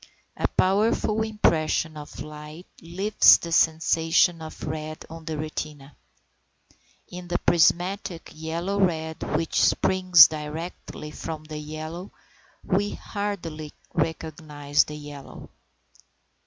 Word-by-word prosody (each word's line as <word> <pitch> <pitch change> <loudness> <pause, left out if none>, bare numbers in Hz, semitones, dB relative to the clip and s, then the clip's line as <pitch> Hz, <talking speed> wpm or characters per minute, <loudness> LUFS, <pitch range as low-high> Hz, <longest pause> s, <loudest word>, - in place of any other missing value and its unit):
A - - 0
powerful 210 +3 +1
impression 165 -7 +1
of 150 -4 -9
light 150 +3 -9 0.2
leaves 190 +5 +5
the 170 - -7
sensation 165 +1 +3
of 160 0 -9
red 155 0 -5
on 165 0 -10
the 160 -1 -4
retina. 150 -2 -6 1.1
In 180 0 -8
the 175 0 0
prismatic 175 +1 +1
yellow 170 +5 -3
red 160 -4 0 0.2
which 165 0 0
springs 185 -3 +6
directly 155 0 -7
from 155 0 -6
the 155 -1 -7
yellow, 155 +4 -7 0.5
we 205 +2 0
hardly 170 -7 -5 0.2
recognise 150 -3 0
the 150 - -8
yellow. 145 -2 -10
160 Hz, 105 wpm, -25 LUFS, 155-180 Hz, 1.1 s, springs